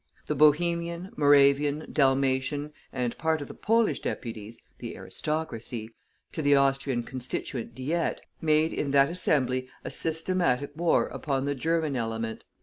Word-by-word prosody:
The - - -1
Bohemian, 170 +4 +2
Moravian, 145 +1 +4
Dalmatian, 135 +1 +1 0.2
and 125 -2 -2
part 160 -1 +1
of 145 - -6
the - - -9
Polish 225 +1 +1
deputies 115 -1 -5 0.2
(the - - -6
aristocracy) 120 -8 -4 0.4
to 160 - -3
the 145 -1 +4
Austrian 135 -2 +1
Constituent 125 -1 -5
Diet, 160 +6 -1 0.2
made 155 0 +2
in 145 - -2
that 140 +2 +4
Assembly 130 -7 +1
a - - -5
systematic 160 -5 0
war 170 +1 +2
upon 135 -2 -2
the 145 - 0
German 160 +1 0
element. 115 -1 -3
140 Hz, 135 wpm, -27 LUFS, 130-160 Hz, 0.4 s, Moravian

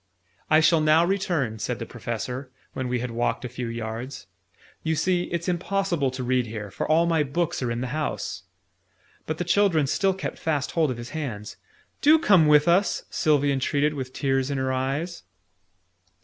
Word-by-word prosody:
"I 155 +1 +6
shall 160 0 +4
now 155 +2 +5
return," 170 - -1
said 120 +3 -2
the 115 - -5
Professor, 125 +3 -5 0.2
when 130 -1 -3
we 125 -1 -1
had 125 -1 -4
walked 120 +1 -1
a - - -2
few 120 +1 -5
yards: 115 +3 -5 0.6
"you 160 0 0
see, 180 +2 +1
it's 170 +1 -4
impossible 180 -4 0
to 130 0 -5
read 125 -1 +1
here, 105 -2 -6
for - - -4
all 165 +2 +4
my 165 -2 +2
books 150 +3 -1
are 125 - -1
in 115 +1 -2
the - - -1
house." 155 -1 -3 0.9
But 155 - -2
the 175 - -1
children 175 -4 +3
still 190 +7 +1
kept 190 - -5
fast 150 -4 -1
hold 160 -3 +2
of 125 - -3
his 120 +2 -8
hands. 125 -9 -5 0.5
"Do 310 +2 +7
come 190 - +5
with 150 +1 +5
us!" 185 +4 +3
Sylvie 145 -3 +2
entreated 145 +2 +1
with 130 -3 -5
tears 135 0 0
in 140 - -1
her 130 0 0
eyes. 140 +7 -2
145 Hz, 185 wpm, -25 LUFS, 125-170 Hz, 0.9 s, Do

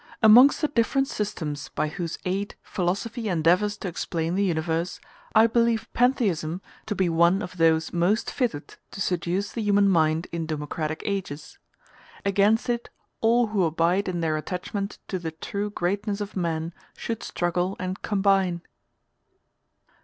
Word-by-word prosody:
Amongst 240 +6 +8
the 305 - +3
different 270 +1 +1
systems 165 - -4
by - - -1
whose 170 +2 -4
aid 195 +2 -2
philosophy 205 +5 -2
endeavors 180 +5 +2
to 195 - -5
explain 165 -1 -2
the 195 +2 +1
universe, 165 -1 -1 0.4
I 220 +1 +8
believe 230 -1 +2
pantheism 190 -10 +1 0.3
to 210 - -2
be 190 -2 +1
one 170 +4 +3
of 185 -1 -8
those 160 -1 +2
most 180 +6 +1
fitted 230 - -3
to - - -10
seduce 180 +2 -1
the 230 - -4
human 205 -1 +3
mind 160 -2 +2
in 165 -1 -3
democratic 155 0 -3
ages. 185 -7 -4 0.7
Against 205 +3 +3
it 240 -1 -2 0.3
all 235 +2 +4
who 205 -3 +1
abide 170 +4 +1
in 175 -2 -2
their 155 -1 0
attachment 195 +5 -4
to 185 - -3
the 165 -2 -4
true 200 +5 -4
greatness 200 +2 -2
of 205 0 -5
man 165 -2 -2 0.2
should 230 -2 -4
struggle 175 +2 -1
and 185 +1 -4
combine. 195 -4 +1
185 Hz, 145 wpm, -25 LUFS, 165-210 Hz, 0.7 s, Amongst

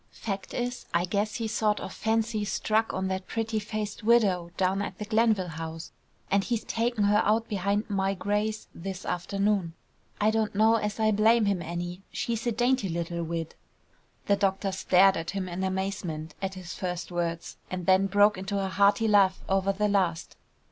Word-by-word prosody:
Fact 195 -3 -5
is, 245 0 -3
I 175 +1 +3
guess 205 +3 -1
he's 225 -2 -2
sort 215 -1 +1
of - - -6
fancy 220 -1 0
struck 215 +2 0
on 190 0 -2
that 190 0 -3
pretty 225 -1 -1
faced 210 0 -4
widow 205 -7 +3
down 190 +1 +1
at 190 -2 -5
the 210 - -5
Glenville 215 -4 +2
House, 160 0 -7 0.4
and 200 0 +3
he's 235 0 -1
taken 230 -1 0
her 205 +1 +4
out 220 +2 +2
behind 200 +2 -1
my 195 -2 0
greys 210 +3 -1
this 190 +2 -6
afternoon. 195 -1 -1 0.4
I 215 +1 +3
don't 220 -2 -1
know 220 +2 +5
as 210 -1 -3
I 215 0 +3
blame 220 +2 +4
him 200 -3 +1
any; 175 +2 -5
she 235 - -2
is 230 +1 -3
a - - +2
dainty 245 -2 +1
little 170 0 -3
wid." 165 -1 -4 0.7
The 200 - +3
doctor 195 0 0
stared 190 0 +4
at 165 0 -4
him 195 -1 -3
in 180 +1 -4
amazement 190 -5 -3
at 190 0 -3
his 180 -2 -7
first 180 -1 -4
words, 170 -1 -3
and 180 -1 -4
then 190 +1 +4
broke 205 0 +4
into 195 +2 -3
a 195 -1 -1
hearty 200 +4 +3
laugh 195 -3 +4
over 195 0 +2
the 210 +2 0
last. 185 -5 0
200 Hz, 185 wpm, -28 LUFS, 185-215 Hz, 0.7 s, know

